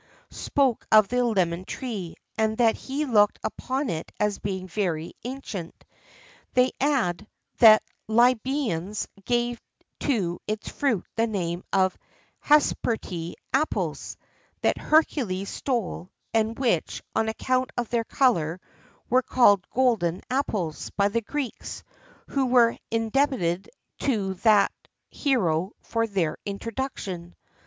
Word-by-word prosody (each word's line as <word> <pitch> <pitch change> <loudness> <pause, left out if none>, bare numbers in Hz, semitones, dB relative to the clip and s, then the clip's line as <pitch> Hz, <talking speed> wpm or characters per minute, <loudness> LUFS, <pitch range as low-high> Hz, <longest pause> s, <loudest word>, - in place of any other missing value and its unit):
C.), - - -15
spoke 270 -5 +1
of 215 -2 +7
the 250 0 +2
lemon 185 -7 +1
tree, 200 -6 -5 0.2
and 220 0 0
that 230 -2 +4
he 280 +3 -3
looked 210 -6 +4
upon 265 +2 -2
it 160 -5 -4
as 210 -1 0
being 190 -2 -4
very 170 -4 -2
ancient. 235 -9 -7 0.7
They 255 +1 +4
add, 220 - +1 0.3
that 220 -2 +8 0.2
the 220 - -5
Lybians 235 - +2 0.2
gave 240 0 0 0.4
to 190 - 0
its 215 0 -3
fruit 250 -10 0
the 230 +1 +3
name 175 -4 -2
of 190 -1 +2 0.4
"Hesperide 220 - +1 0.2
apples," 295 +4 -1 0.4
that - - +1
Hercules 235 -11 +1
stole, 225 -8 -2 0.2
and 225 0 +1
which, 230 - 0
on 220 - +2
account 255 +3 0
of 240 -2 -1
their 235 -1 +1
colour, 180 - +2 0.5
were 255 +2 +4
called 205 -7 +4
"golden 225 -10 +1
apples" 205 - -1
by 200 0 +3
the 230 +3 0
Greeks, 270 +2 -5 0.4
who 270 -2 0
were 240 -2 +5
indebted 225 -6 0 0.3
to 205 -8 0
that 210 -3 +5 0.4
hero 190 - +1
for 230 0 -1
their 185 -7 -1
introduction. 200 -5 -5
220 Hz, 120 wpm, -26 LUFS, 185-255 Hz, 0.7 s, that